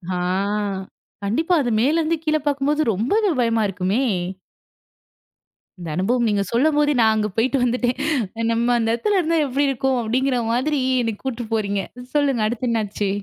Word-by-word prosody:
ஆ - - -1 1.1
கண்டிப்பா. 315 - 0
அது 245 - -1
மேல 285 +6 +2
இருந்து 325 +1 0
கீழ 310 0 +2
பாக்கும் 280 -1 0
போது 300 +1 +1
ரொம்பவே 395 - +1
பயமா 230 -2 +1
இருக்குமே? 195 +6 -1 1.8
இந்த 170 -2 -6
அனுபவம் 235 +6 +1
நீங்கச் 200 -3 -1
சொல்லும்போதே 295 +4 +2
நான் 220 -1 +5
அங்க 210 -1 0
போயிட்டு 250 +4 +2
வந்துட்டேன். 245 0 0 0.5
நம்ம 230 +1 +1
அந்த 225 -1 0
இடத்துல 410 - +1
இருந்தா 330 -1 +1
எப்படி 280 +2 0
இருக்கும்? 265 -1 0
அப்படிங்கிற 250 +3 0 0.2
மாதிரி 285 +4 0 0.2
என்னக் 225 -3 -3
கூட்டு 245 -3 -3
போறீங்க. 200 -2 0 0.3
சொல்லுங்க 275 -6 +2
அடுத்து 240 +2 -3
என்ன 225 -2 +1
ஆச்சு? 205 0 -3
245 Hz, 155 wpm, -21 LUFS, 220-285 Hz, 1.8 s, நான்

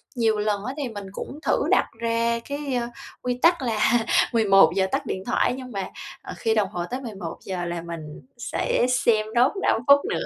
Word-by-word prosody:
Nhiều 225 -3 +2
lần 210 0 -1
á 260 - -3
thì 275 -4 -2
mình 205 -3 -7
cũng 280 +8 -7
thử - - +2
đặt - - +4
ra 230 0 +1
cái, 285 -2 -3
ơ, 235 -1 -1 0.3
quy 250 0 -2
tắc 335 -3 +4
là 230 -1 +2 0.3
11:00 195 -4 +5
tắt 275 0 -1
điện 190 -3 -4
thoại - - +2
á, 250 - -2
nhưng 255 -1 -8
mà, 195 -2 -4 0.3
ờ, - - -8
khi 225 -1 +1
đồng 200 -3 +2
hồ 175 -4 -3
tới 260 +2 -3
11:00 190 -4 -5
là 170 -1 -3
mình 165 -3 -8 0.2
sẽ 245 0 0
xem 230 -3 +3
nốt 250 +3 +5
5 225 - +2
phút 280 0 +8
nữa. - - -1
225 Hz, 205 wpm, -24 LUFS, 195-250 Hz, 0.3 s, phút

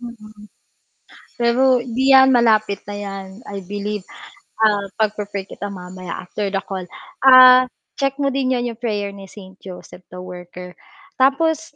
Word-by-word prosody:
Mm, 215 -3 -12 0.9
pero 250 +2 +3
'di 255 +3 +1
'yan, 265 0 +7
malapit 220 -5 +2
na 205 - -8
'yan, 195 -1 -7 0.2
I 200 -2 -7
believe, 205 +1 -5 0.6
ah, 205 -2 +2
pagpi-pray 210 -2 -2
kita 200 +1 -8
mamaya 185 -2 -8
after 200 +3 -4
the 195 0 -3
call. 190 -2 -6 0.3
Ah, 255 -1 +8 0.3
check 275 -1 0
mo 275 - +1
din 260 -1 0
'yan 240 -1 -2
'yong 230 - -14
prayer 205 -4 -3
ni 200 -1 -12
Saint 190 -1 -14
Joseph 185 -1 -12
the - - -14
Worker, 180 0 -10 0.5
tapos, 310 +3 +1
210 Hz, 150 wpm, -19 LUFS, 195-255 Hz, 0.9 s, Ah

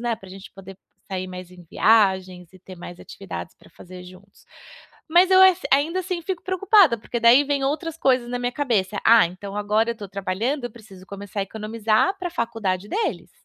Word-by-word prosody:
né, 235 -1 -2
pra 190 -3 -15
a - - -13
gente 195 0 -12
poder 195 0 -13 0.3
sair 185 -1 -4
mais 180 -1 -9
em 180 -1 -15
viagens 190 -5 +2
e - - -15
ter 185 0 -13
mais 175 0 -10
atividades 195 - -9
pra - - -21
fazer 180 0 -13
juntos. 185 +2 -17 0.6
Mas 360 +3 +4
eu 375 - +7
es 375 -1 +5
ainda, 310 +7 +2
assim, 365 -2 -4
fico 365 0 -5
preocupada, 375 - +3
porque 235 +2 -5
daí 235 +5 +6
vem 280 -1 -1
outras 310 +4 -2
coisas 255 -5 +1
na 245 - -3
minha 245 0 -2
cabeça: 215 -8 -1
"Ah, 225 -4 +7
então, 195 +3 -8
agora 210 +2 0
eu 235 - -7
tô 205 -2 -8
trabalhando, 205 +8 -3
eu 240 - -6
preciso 200 -5 -15
começar 200 0 -8
a - - 0
economizar 220 - -1
pra 360 - -3
a - - -9
faculdade 205 - -3
deles. 450 - -3
220 Hz, 205 wpm, -22 LUFS, 190-280 Hz, 0.6 s, eu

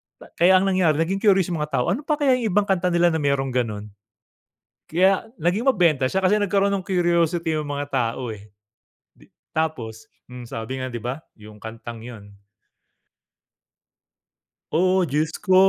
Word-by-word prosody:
Ba - - -16
kaya 180 +3 +6
ang 185 - +4
nangyari 185 -5 +2
naging 190 +4 -2
curious 195 -4 +3
yung 170 - -2
mga 150 0 -3
tao, 125 +7 +1
ano 280 +10 -3
pa 300 - +2
kaya 275 -4 +2
yung 230 - -1
ibang 205 - +4
kanta 190 -2 0
nila 175 -1 +3
na 160 - -1
merong 140 -2 0
ganun? 105 -4 -3 1.0
Kaya, 190 +5 +2
naging 180 - 0
mabenta 165 - +2
siya 190 +6 -1
kasi 210 +3 +3
nagkaroon 200 0 +1
ng 190 -2 -2
curiosity 170 -3 +1
yung 150 -2 -3
mga 145 0 -3
tao, 120 -1 -1
eh. 105 0 -13 0.6
Di - - -22 0.3
tapos, 125 -9 -3 0.2
mm, 125 -1 -9
sabi 115 +1 -5
nga, 130 - -3
di 120 -2 -6
ba? 125 +4 -3 0.2
Yung 105 0 -14
kantang 115 +1 -8
'yon. 110 -4 -10 2.4
Oh! 185 +2 +2
Diyos 155 +3 0
ko 185 -2 +2
160 Hz, 170 wpm, -23 LUFS, 125-190 Hz, 2.4 s, kaya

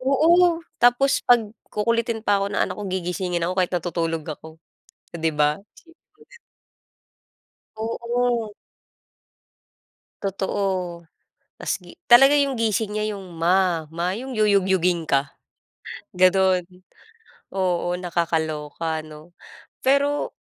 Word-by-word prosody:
Oo, 330 +6 +3 0.2
tapos 245 +3 +4
'pag 230 -4 +3 0.2
kukulitin 230 +1 -1
pa 205 -1 +2
ako 195 - 0
ng - - 0
anak - - -2
ko, - - -5
gigisingin 180 -1 -2
ako 175 - -1
kahit 180 -1 +1
natutulog 165 -2 -2
ako. 155 0 -8 0.4
Oh, 170 - -13
'di 160 0 +1
ba? 150 0 +2
Isipin 335 0 -20 0.2
mo 435 - -33
'yan. - - -18 1.4
Oo. 235 0 -1 1.7
Totoo. 190 -3 -2 0.6
Tas - - -2
gi - - -15
Talaga 270 +4 +7
'yong 280 -1 +1
gising 220 -2 -1
niya 215 0 -1
'yong, 195 -2 -7 0.2
"Ma, 175 -3 +2
ma." 170 +3 -2
'Yong 250 +1 -6
yuyugyugin 190 -4 +2
ka. 140 -2 0 0.8
Gano'n. 185 0 +4 0.9
Oo, 180 -2 0
nakakaloka, 160 -2 -2
ano. 155 +1 -13 0.6
Pero 280 +2 +2
190 Hz, 115 wpm, -23 LUFS, 170-235 Hz, 1.7 s, Talaga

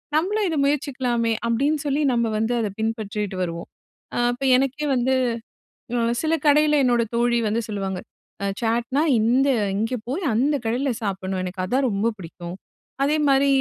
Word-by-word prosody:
"நம்பளும் 400 +6 +1
இதை 315 - -1
முயற்சிக்கலாமே!" 255 -5 0
அப்படீன்னு 280 +6 +1
சொல்லி, 285 +1 +1
நம்ம 235 -1 +2
வந்து 225 +2 0
அதை 210 -3 -2
பின்பற்றிட்டு 210 -3 -2
வருவோம். 170 -1 -5 0.5
அ - - 0
இப்ப 260 +3 -7
எனக்கே 275 +3 -1
வந்து 255 +2 +1 0.9
அ - - +1 0.2
சில 320 0 +1
கடையில 300 0 +5
என்னோட 240 -1 +3
தோழி 240 0 +2
வந்து 225 +3 0
சொல்லுவாங்க 195 -3 -3 0.4
"அ - - +1 0.2
சாட்னா 235 +5 +1 0.2
இந்த 255 +5 +3 0.3
இங்க 225 +4 -1
போய், 340 +8 -2
அந்த 285 +6 +2
கடைல 255 +5 0
சாப்பிடணும். 190 -1 -2
எனக்கு 185 0 -4
அதான் 260 +5 +1
ரொம்ப 205 +3 +1
புடிக்கும்." 175 +1 -8 0.5
அதே 295 +2 +2
மாரி 275 0 +4
240 Hz, 155 wpm, -23 LUFS, 210-280 Hz, 0.9 s, கடையில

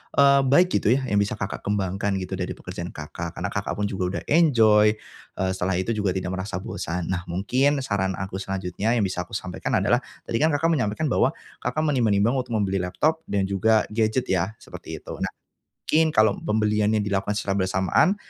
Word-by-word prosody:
eee, 140 0 +6
baik 175 +7 +4
gitu 115 - +3
ya, 135 - -1
yang 105 -6 +1
bisa 100 0 0
Kakak 100 - -5
kembangkan 100 0 -1
gitu 95 0 -4
dari 90 - -3
pekerjaan - - -7
Kakak, - - -6
Karena - - -3
Kakak - - -2
pun 105 - -2
juga 95 -1 -2
udah - - -3
enjoy, 110 -9 +5 0.4
eee, 95 0 0
setelah 95 0 -1
itu 95 +5 -1
juga 105 -4 0
tidak 90 -1 -2
merasa 95 0 -4
bosan. 90 -6 -4
Nah, 90 -1 -3
mungkin 130 +10 +1
saran 95 -5 -1
aku 95 +1 -5
selanjutnya 95 +3 -2
yang 115 - +2
bisa 90 -2 -2
aku - - -7
sampaikan 95 -2 -3
adalah, - - +3 0.2
tadi 115 - -2
kan 155 - +4
Kakak 160 +2 +1
menyampaikan 130 0 0
bahwa - - +2 0.2
kakak 155 - -1
menimbang-nimbang 115 -7 +2
untuk 125 -2 -3
membeli 95 -2 0
laptop 150 - 0
dan 100 -1 0
juga 100 +3 +2
gadget 110 +3 +1
ya, 95 +3 0
seperti - - -8
itu. - - -8
Nah. - - 0 0.6
Mungkin 160 +1 +3
kalau 110 -1 +5
pembeliannya 105 0 +1
dilakukan 100 0 -1
secara 100 -1 -1
bersamaan, 95 - +2
105 Hz, 190 wpm, -24 LUFS, 95-115 Hz, 0.6 s, eee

